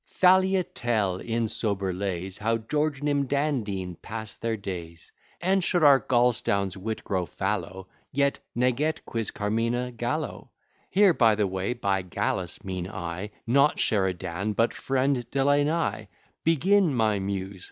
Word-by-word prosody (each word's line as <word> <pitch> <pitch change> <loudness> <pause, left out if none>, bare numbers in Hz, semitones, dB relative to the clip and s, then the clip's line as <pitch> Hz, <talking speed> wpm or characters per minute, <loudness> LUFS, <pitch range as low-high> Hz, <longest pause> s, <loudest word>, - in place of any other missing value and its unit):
Thalia, 190 0 +4
tell, 110 - -1
in 115 +2 -1
sober 100 -4 -1
lays, 95 0 -3
How 115 +2 +1
George, 145 +5 -1
Nim, 145 -2 +1
Dan, 140 -1 +1
Dean, 95 -3 -4
pass 110 -2 -6
their 115 -1 -2
days; 85 -4 -7 0.3
And, 190 +1 +2
should 175 -1 +1
our 140 -2 +8
Gaulstown's 115 -7 +1
wit 110 +3 -4
grow 95 -4 -1
fallow, 95 +5 -3 0.2
Yet 140 0 +1 0.2
Neget 130 +6 0
quis 115 -2 -3
carmina 115 +4 -1
Gallo? 120 +6 -3 0.4
Here 195 -2 +5
(by 115 -7 +4
the 105 0 +1
way) 95 +4 -2
by 100 -5 0
Gallus 90 -2 -3
mean 90 -2 -4
I 90 +3 -5 0.2
Not 140 +5 +4
Sheridan, 95 0 0
but 115 +2 +2
friend 135 -1 0
Delany. 145 +4 +1 0.4
Begin, 165 +1 +3
my 110 -3 +2
Muse! 95 0 -4
115 Hz, 140 wpm, -26 LUFS, 95-140 Hz, 0.4 s, our